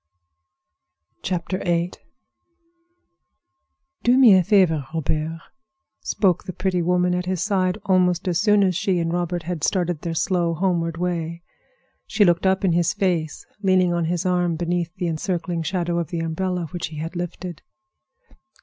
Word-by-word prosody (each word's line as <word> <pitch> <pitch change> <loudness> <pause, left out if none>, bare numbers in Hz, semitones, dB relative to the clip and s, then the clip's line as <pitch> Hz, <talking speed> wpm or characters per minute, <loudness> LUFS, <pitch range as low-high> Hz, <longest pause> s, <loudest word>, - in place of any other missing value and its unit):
VIII 175 -1 -1 2.1
"Do 245 +2 +4
me 250 -6 +8
a 185 - +4
favor, 175 -8 +3
Robert," 160 +1 -2 0.6
spoke 190 -4 0
the 185 - -5
pretty 185 -1 -1
woman 180 +1 +2
at 180 0 -2
his 185 -2 -1
side, 190 -2 0
almost 180 -1 +2
as 175 -2 +1
soon 210 -1 +4
as 185 -2 +1
she 190 +1 0
and 165 0 -1
Robert 175 -1 -2
had 170 -2 -4
started 175 -5 0
their 170 -2 -3
slow, 170 -1 0
homeward 170 -2 0
way. 170 -1 -3 0.6
She 215 -2 +3
looked 175 +1 +2
up 190 +1 +2
in 185 - +3
his 170 0 +2
face, 170 -6 -1 0.2
leaning 185 -3 +3
on 170 -1 0
his 175 +1 -2
arm 180 -2 +1
beneath 175 0 -2
the 180 - -3
encircling 170 +1 -2
shadow 175 0 -1
of 170 - -2
the 170 -2 -3
umbrella 180 +2 -2
which 175 -3 -4
he 155 -1 -10
had 165 +4 -5
lifted. 175 0 -5
175 Hz, 150 wpm, -22 LUFS, 170-185 Hz, 2.1 s, me